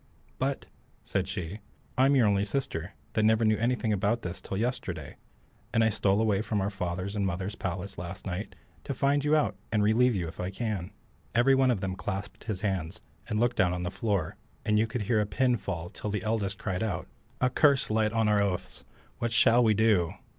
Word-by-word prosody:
"But," - - -1 0.4
said 95 -1 -1
she, 95 0 -5 0.4
"I'm 135 +2 +4
your 125 -4 +5
only 100 -1 +3
sister, 100 - -3 0.2
that 110 - +2
never 110 +1 +4
knew 110 -1 +3
anything 120 -1 +1
about 105 +4 0
this 90 +1 -5
till 95 - -4
yesterday; 120 +3 -3 0.5
and 115 - +3
I 110 - +4
stole 100 -1 +2
away 105 -3 +2
from 110 -1 -1
our 100 +2 -1
father's 95 +1 -3
and 100 - 0
mother's 95 +1 -2
palace 95 -1 -4
last 90 +3 -7
night 95 +2 -4 0.3
to - - -3
find 140 +1 +2
you 150 +1 +3
out 150 -10 +1
and 105 -2 +2
relieve 115 +3 +4
you 90 -3 -1
if 80 - -10
I 90 - -2
can." 100 -3 -3 0.5
Every 120 +3 +5
one 135 -1 +4
of 115 -6 +1
them 95 -2 -2
clasped 95 +1 -5
his 105 -5 -3
hands, 95 -1 -2 0.3
and 105 -2 0
looked 120 +1 +2
down 90 -1 +3
on 90 0 -3
the 90 - -2
floor, 95 -4 -1 0.3
and 105 0 +3
you 110 - +2
could 115 -1 -3
hear 110 +1 +2
a 105 - -1
pin 125 +3 +2
fall 85 -5 -4
till 105 - -5
the 105 -2 -2
eldest 105 -3 -1
cried 95 -2 -3
out, 110 -5 -2 0.3
"A 130 -1 +2
curse 140 -3 +3
light 110 0 +2
on 110 -1 +2
our 105 -1 +4
oath! 95 -3 -2 0.4
what 120 - -1
shall 120 +1 +5
we 110 -2 +4
do?" 105 -6 +3
105 Hz, 210 wpm, -29 LUFS, 95-115 Hz, 0.5 s, your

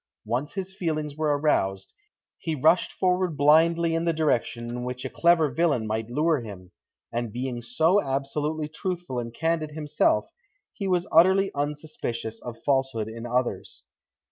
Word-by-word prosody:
Once 125 +7 -2
his 190 -1 -5
feelings 155 -5 -2
were 150 -2 +1
aroused, 95 -10 0 0.5
he 160 -2 -2
rushed 160 +6 +3
forward 180 -3 0
blindly 165 +3 +4
in 165 0 0
the 170 - +2
direction 125 -7 0
in 120 +1 -4
which 125 0 -5
a - - -4
clever 170 -2 +4
villain 145 -6 +1
might 110 +1 -2
lure 150 +3 +1
him, 95 -5 -10 0.4
and 120 -1 -2
being 125 +1 -4
so 160 - +2
absolutely 150 +2 -2
truthful 170 -4 -4
and 115 -1 -5
candid 160 0 0
himself, 150 -1 +1 0.4
he 200 - -4
was 180 -2 +1
utterly 190 +4 +5
unsuspicious 145 -6 -4
of 120 -1 -7
falsehood 135 -6 +1
in 115 +2 -7
others. 125 +1 -2
150 Hz, 150 wpm, -26 LUFS, 120-165 Hz, 0.5 s, utterly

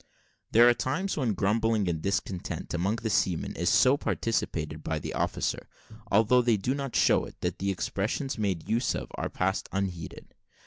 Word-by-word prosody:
There 120 +2 +7
are 120 - +7
times 170 +11 -2
when 125 -8 0
grumbling 110 +1 +1
and 80 -3 -1
discontent 95 -1 -3
among 95 +5 0
the 115 -1 -3
seamen 90 -4 0
is - - +1
so 130 +3 +5
participated 80 - -2
by 80 - -2
the 75 - -5
officer, - - -2 0.4
although 110 +5 +5
they 120 -3 +2
do 120 +7 -1
not 140 -2 -4
show - - +4
it, - - -13
that - - -2
the 100 - -1
expressions 100 +8 -2
made 100 -7 -2
use 115 +3 +1
of - - -5
are - - -3
passed 95 +1 -1
unheeded. 95 -5 -4
105 Hz, 175 wpm, -28 LUFS, 95-120 Hz, 0.4 s, There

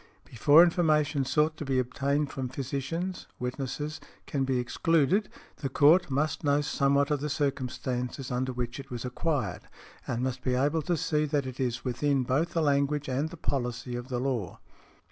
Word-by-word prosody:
"Before 145 +7 +6
information 155 -5 +2
sought 155 +3 +1
to - - -5
be 135 -2 0
obtained 140 +3 0
from 130 -2 -4
physicians, 140 +8 -4
witnesses, 135 +4 -4 0.2
can 135 -2 -1
be 130 -1 +1
excluded 165 - +2 0.3
the 135 - -3
court 155 +7 +5
must 145 +3 -1
know 145 0 +3
somewhat 140 0 +2
of 145 -2 +1
the 150 - -2
circumstances 130 -2 -2
under 130 +1 -1
which 120 0 -4
it 135 0 -9
was 120 0 -5
acquired, 125 - -2 0.4
and 120 +1 -1
must 130 -1 -2
be 130 -1 0
able 145 +5 +1
to 175 +2 0
see 150 0 +1
that 145 -2 0
it 130 -1 -7
is 120 -2 -2
within 135 +2 +1
both 140 +7 0
the 165 - +1
language 140 0 +1
and 140 +5 0
the 170 - -10
policy 125 -3 -3
of 120 +1 -5
the 125 -2 -2
law". 125 -8 -2
140 Hz, 175 wpm, -29 LUFS, 125-150 Hz, 0.4 s, Before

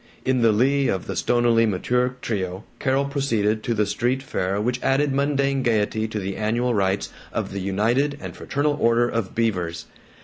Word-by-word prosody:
In 130 -1 +2
the 115 -1 +5
lee 135 +5 +2
of 95 - -1
the - - -4
stonily 120 -1 +3
mature 125 +6 0
trio 95 -3 -3 0.2
Carol 135 +1 +1
proceeded 115 -7 0
to 115 +1 -1
the 105 0 +2
street 125 +5 -1
fair 95 -6 -2
which 125 +4 -1
added 135 +1 +2
mundane 140 -1 +1
gaiety 110 -2 +1
to 110 - -5
the 95 -1 -3
annual 120 +3 0
rites 95 -2 0 0.2
of - - -3
the 100 - -4
United 115 +9 +1
and - - -7
Fraternal 145 +1 -1
Order 115 +1 +4
of 115 -5 -3
Beavers. 90 -8 -1
115 Hz, 175 wpm, -23 LUFS, 105-130 Hz, 0.2 s, the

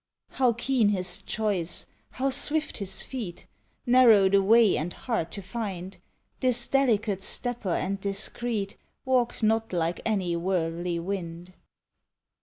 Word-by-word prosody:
How 250 -3 +2
keen 240 -2 +1
his 185 -3 +1
choice, 200 -6 -1 0.2
how 270 +1 -1
swift 305 +2 0
his 195 -2 -1
feet! 220 -10 -6 0.4
Narrow 235 -6 +6
the 200 0 +4
way 220 +1 +5
and 165 +4 -2
hard 175 -6 -3
to 200 - -6
find! 190 -3 -5 0.4
This 245 -2 +2
delicate 220 -7 +1
stepper 240 0 -3
and 195 +3 -1
discreet 200 +1 -2 0.3
Walked 250 -3 +1
not 225 +1 +1
like 170 0 -1
any 190 -6 0
worldly 170 -1 -1
wind. 175 -1 -5
200 Hz, 125 wpm, -27 LUFS, 180-240 Hz, 0.4 s, Narrow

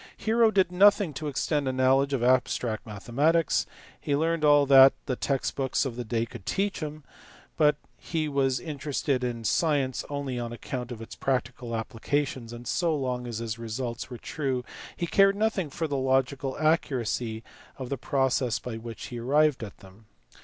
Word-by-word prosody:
Hero 225 +1 +3
did 190 -4 +2
nothing 200 -2 +4
to 150 +2 -5
extend 145 0 -1
a - - +1
knowledge 130 +2 +3
of 135 -4 0
abstract 125 -3 +1
mathematics; 140 +10 +1 0.3
he 145 - -1
learnt 165 +2 0
all 145 -1 +6
that 135 -1 +8
the 130 - -1
text 135 +1 -1
books 135 +1 0
of 125 -4 -4
the 125 - -4
day 115 0 -1
could 115 - -11
teach 200 - -1
him, 155 -2 -6 0.5
but 150 -1 +4 0.2
he 160 -2 -2
was 135 -3 +1
interested 140 -1 -2
in 120 -2 -3
science 140 -1 +1
only 140 -3 -3
on 120 -1 -4
account 125 +1 -5
of 115 -2 -6
its - - -10
prac 130 -3 0
tical 120 -1 -6
applications, 120 +2 -2
and 120 +1 -9
so 170 -3 +1
long 125 -3 -2
as 115 -2 -4
his 115 0 -4
results 115 +1 -4
were 125 - -7
true 130 -2 -3 0.3
he 170 - -1
cared 195 +3 +4
nothing 205 -6 0
for 160 +4 -3
the 145 -2 -2
logical 130 0 0
accuracy 125 -7 0 0.3
of 130 -2 -6
the 140 - -1
process 130 -3 0
by 120 -2 -6
which 115 0 -8
he 120 - -6
arrived 145 +2 +2
at 100 - -10
them. 95 +3 -17
135 Hz, 180 wpm, -27 LUFS, 120-150 Hz, 0.5 s, that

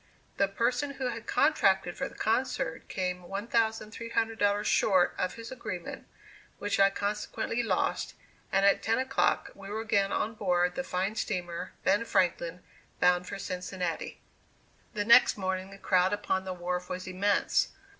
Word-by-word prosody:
The 200 - +3
person 245 +8 -1
who 260 -2 -2
had 230 -1 -6
contracted 195 - +3
for 270 - -3
the - - -16
concert 225 -7 -1
came 180 -1 -2
$1,300 220 +1 0
short 185 -4 +3
of 185 - -1
his 230 +1 -9
agreement, 185 -9 -6 0.5
which 205 -1 -1
I 195 0 +7
consequently 210 +3 -2
lost, 230 - -1 0.4
and 195 +1 +3
at 200 - +4
ten 225 +1 +1
o'clock 260 +1 +1
we 195 0 -11
were 215 +2 -3
again 200 -3 +1
on 220 - -1
board 180 -4 +1
the 270 - -3
fine 190 -2 -1
steamer 175 -4 -3
"Ben 205 +4 +3
Franklin" 180 -3 0 0.4
bound 180 0 +3
for 200 - -5
Cincinnati. 180 -2 -4 0.8
The 205 -1 -1
next 235 +1 +7
morning 190 -1 -2
the 195 - -11
crowd 185 0 +2
upon 190 -2 -1
the 185 - -3
wharf 180 0 -3
was 185 0 -4
immense. 195 +2 +1
195 Hz, 150 wpm, -29 LUFS, 185-225 Hz, 0.8 s, I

